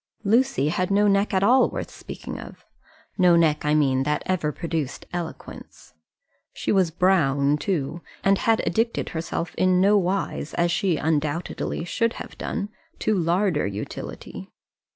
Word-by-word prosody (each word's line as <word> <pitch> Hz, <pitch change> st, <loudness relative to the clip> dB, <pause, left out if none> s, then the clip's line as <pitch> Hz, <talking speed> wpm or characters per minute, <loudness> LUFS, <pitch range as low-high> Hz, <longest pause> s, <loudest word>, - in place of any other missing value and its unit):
Lucy 230 Hz, -, +2 dB
had 180 Hz, +3 st, -1 dB
no 205 Hz, +1 st, +3 dB
neck 200 Hz, +1 st, +2 dB
at 190 Hz, -1 st, +1 dB
all 255 Hz, +5 st, +5 dB
worth -, -, -5 dB
speaking -, -, -8 dB
of, -, -, -11 dB, 0.5 s
no 180 Hz, -2 st, +6 dB
neck, 160 Hz, -3 st, +3 dB
I 150 Hz, 0 st, +2 dB
mean, 135 Hz, -3 st, +2 dB
that 150 Hz, +2 st, -1 dB
ever 170 Hz, -5 st, 0 dB
produced 160 Hz, -3 st, -4 dB
eloquence; 175 Hz, -2 st, -8 dB, 0.6 s
she -, -, -2 dB
was 190 Hz, -4 st, +3 dB
brown, 150 Hz, -6 st, +2 dB
too, 170 Hz, -2 st, -2 dB, 0.2 s
and 195 Hz, 0 st, +3 dB
had 225 Hz, -1 st, +2 dB
addicted 230 Hz, +1 st, 0 dB
herself 165 Hz, +1 st, -4 dB
in 185 Hz, -1 st, +4 dB
nowise, 195 Hz, -4 st, +1 dB
as 170 Hz, 0 st, +2 dB
she 175 Hz, -2 st, +1 dB
undoubtedly 155 Hz, +2 st, -2 dB
should 230 Hz, +5 st, 0 dB
have -, -, -9 dB
done, 205 Hz, -2 st, -3 dB, 0.3 s
to 220 Hz, -, 0 dB
larder 175 Hz, -, +1 dB
utility. 100 Hz, +1 st, -7 dB
175 Hz, 145 wpm, -24 LUFS, 150-200 Hz, 0.6 s, no